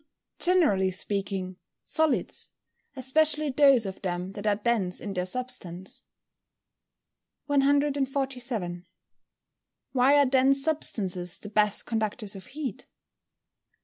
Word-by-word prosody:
_ -, -, -1 dB
Generally 305 Hz, -, +3 dB
speaking, 190 Hz, -1 st, -3 dB, 0.3 s
solids, 315 Hz, -2 st, -1 dB, 0.5 s
especially 300 Hz, +3 st, +2 dB
those 275 Hz, -4 st, +5 dB
of 190 Hz, -1 st, -6 dB
them 180 Hz, 0 st, -3 dB
that 205 Hz, +1 st, -5 dB
are 205 Hz, -, +3 dB
dense 205 Hz, -4 st, -1 dB
in 200 Hz, -, -5 dB
their 180 Hz, -1 st, -2 dB
substance. 190 Hz, -6 st, -5 dB, 1.4 s
147. 270 Hz, -9 st, 0 dB, 1.1 s
_Why 270 Hz, +2 st, +5 dB
are 285 Hz, -, +5 dB
dense 270 Hz, +1 st, +3 dB
substances 190 Hz, -, 0 dB
the 210 Hz, -, -9 dB
best 210 Hz, -1 st, +1 dB
conductors 215 Hz, -2 st, -2 dB
of 190 Hz, -1 st, -10 dB
heat? 280 Hz, -7 st, -6 dB
235 Hz, 105 wpm, -27 LUFS, 190-275 Hz, 1.4 s, those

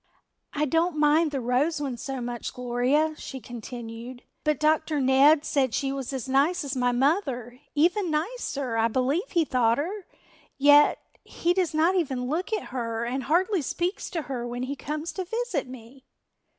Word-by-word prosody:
"I 300 Hz, +1 st, +1 dB
don't 325 Hz, +2 st, +1 dB
mind 305 Hz, +2 st, +4 dB
the 280 Hz, -2 st, -3 dB
Rose 260 Hz, +6 st, +1 dB
one 275 Hz, -4 st, -3 dB
so 265 Hz, +2 st, -5 dB
much, 240 Hz, -1 st, -5 dB
Gloria," 250 Hz, +6 st, +1 dB
she 265 Hz, -, -7 dB
continued, 240 Hz, 0 st, -8 dB, 0.2 s
"but 305 Hz, -3 st, +1 dB
Dr. 310 Hz, 0 st, +2 dB
Ned 275 Hz, +3 st, +5 dB
said 265 Hz, -5 st, +1 dB
she 270 Hz, -1 st, -1 dB
was 270 Hz, -2 st, -4 dB
as 265 Hz, -1 st, -4 dB
nice 290 Hz, +7 st, +2 dB
as 280 Hz, -1 st, -4 dB
my 250 Hz, -1 st, +2 dB
mother, 250 Hz, -, 0 dB, 0.2 s
even 355 Hz, +5 st, +2 dB
nicer 300 Hz, -, -2 dB
I 225 Hz, 0 st, +3 dB
believe 270 Hz, -, 0 dB
he 340 Hz, -3 st, +2 dB
thought 235 Hz, -4 st, +2 dB
her. 370 Hz, +7 st, -4 dB, 0.5 s
Yet 290 Hz, +1 st, +6 dB, 0.3 s
he 345 Hz, +1 st, 0 dB
does 355 Hz, -4 st, 0 dB
not 325 Hz, +4 st, +3 dB
even 270 Hz, -9 st, -1 dB
look 330 Hz, -, -2 dB
at 430 Hz, -3 st, -2 dB
her 235 Hz, -2 st, -3 dB
and 255 Hz, +1 st, -3 dB
hardly 365 Hz, -, +2 dB
speaks 350 Hz, +7 st, -2 dB
to 330 Hz, -4 st, -3 dB
her 245 Hz, -4 st, -4 dB
when 245 Hz, +1 st, -4 dB
he 275 Hz, +2 st, -3 dB
comes 305 Hz, +4 st, -4 dB
to 375 Hz, -, -4 dB
visit 450 Hz, -, -2 dB
me." 255 Hz, +1 st, -13 dB
280 Hz, 175 wpm, -26 LUFS, 250-325 Hz, 0.5 s, Yet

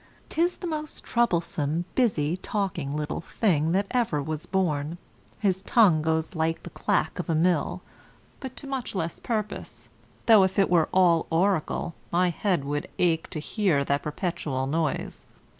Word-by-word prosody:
'Tis 345 Hz, +2 st, +1 dB
the -, -, -8 dB
most 305 Hz, -2 st, -4 dB
troublesome, 170 Hz, -8 st, 0 dB
busy 175 Hz, -, +2 dB
talking 180 Hz, -7 st, -2 dB
little 150 Hz, +2 st, -3 dB
thing 165 Hz, -5 st, +1 dB
that 195 Hz, +3 st, +2 dB
ever 235 Hz, -12 st, +1 dB
was 155 Hz, +2 st, -4 dB
born; 165 Hz, -4 st, 0 dB, 0.4 s
his 190 Hz, -3 st, +1 dB
tongue 195 Hz, -7 st, +4 dB
goes 160 Hz, +1 st, 0 dB
like 165 Hz, -1 st, -1 dB
the -, -, -8 dB
clack -, -, 0 dB
of -, -, -4 dB
a 165 Hz, -, +2 dB
mill, 175 Hz, +2 st, +1 dB, 0.6 s
but 260 Hz, -1 st, -7 dB
to -, -, -9 dB
much 265 Hz, -6 st, -4 dB
less 170 Hz, -3 st, -2 dB
purpose, 215 Hz, -3 st, -4 dB, 0.4 s
though 220 Hz, -3 st, +7 dB
if 190 Hz, 0 st, +1 dB
it 195 Hz, -3 st, +3 dB
were 165 Hz, -3 st, +4 dB
all 175 Hz, -3 st, +4 dB
oracle, 170 Hz, -1 st, +1 dB, 0.2 s
my 180 Hz, +1 st, +3 dB
head 180 Hz, -3 st, 0 dB
would 145 Hz, +1 st, -2 dB
ache 165 Hz, -2 st, +1 dB
to -, -, -6 dB
hear 160 Hz, -4 st, +1 dB
that 140 Hz, +1 st, +1 dB
perpetual 150 Hz, -4 st, -2 dB
noise. 155 Hz, +1 st, -2 dB
170 Hz, 160 wpm, -26 LUFS, 155-200 Hz, 0.6 s, though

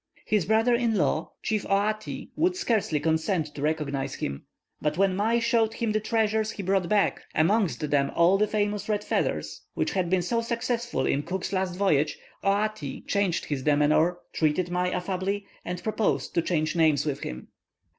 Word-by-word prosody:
His 210 Hz, -6 st, +1 dB
brother 225 Hz, +3 st, +3 dB
in 235 Hz, -2 st, +2 dB
law, 160 Hz, -4 st, 0 dB
chief 215 Hz, -2 st, 0 dB
Outi, 215 Hz, +2 st, -1 dB
would 355 Hz, +3 st, +2 dB
scarcely 220 Hz, -, 0 dB
consent 160 Hz, +1 st, 0 dB
to 140 Hz, -, -7 dB
recognize 140 Hz, -3 st, -1 dB
him, 70 Hz, 0 st, -5 dB, 0.3 s
but 150 Hz, +1 st, -1 dB
when 195 Hz, -1 st, +3 dB
Mai 220 Hz, +4 st, +2 dB
showed 230 Hz, -1 st, +2 dB
him 230 Hz, -3 st, -1 dB
the 215 Hz, -, +1 dB
treasures 220 Hz, 0 st, +1 dB
he 205 Hz, -, -5 dB
brought 190 Hz, -1 st, +1 dB
back, 210 Hz, -1 st, +2 dB
amongst 170 Hz, -2 st, +2 dB
them 140 Hz, -1 st, +3 dB
all 175 Hz, +4 st, +4 dB
the 210 Hz, -, +3 dB
famous 210 Hz, 0 st, -1 dB
red 210 Hz, -1 st, 0 dB
feathers, -, -, -1 dB
which -, -, 0 dB
had 185 Hz, -3 st, 0 dB
been 185 Hz, -1 st, +2 dB
so 230 Hz, +6 st, 0 dB
successful 235 Hz, +1 st, -1 dB
in 140 Hz, -, +1 dB
Cook's 185 Hz, +5 st, -4 dB
last 185 Hz, -2 st, -1 dB
voyage, 155 Hz, -6 st, +2 dB, 0.3 s
Oati 200 Hz, -7 st, -1 dB
changed 200 Hz, -4 st, 0 dB
his 145 Hz, -3 st, -2 dB
demeanour, 150 Hz, +4 st, +3 dB, 0.2 s
treated 170 Hz, +3 st, +1 dB
Mai 180 Hz, +1 st, +1 dB
affably, 190 Hz, +2 st, -2 dB, 0.2 s
and 180 Hz, 0 st, -5 dB
proposed 215 Hz, -1 st, 0 dB
to 170 Hz, -, +2 dB
change 155 Hz, -2 st, 0 dB
names 155 Hz, -3 st, +3 dB
with 140 Hz, -2 st, -2 dB
him. 65 Hz, -, -7 dB
190 Hz, 175 wpm, -27 LUFS, 155-215 Hz, 0.3 s, all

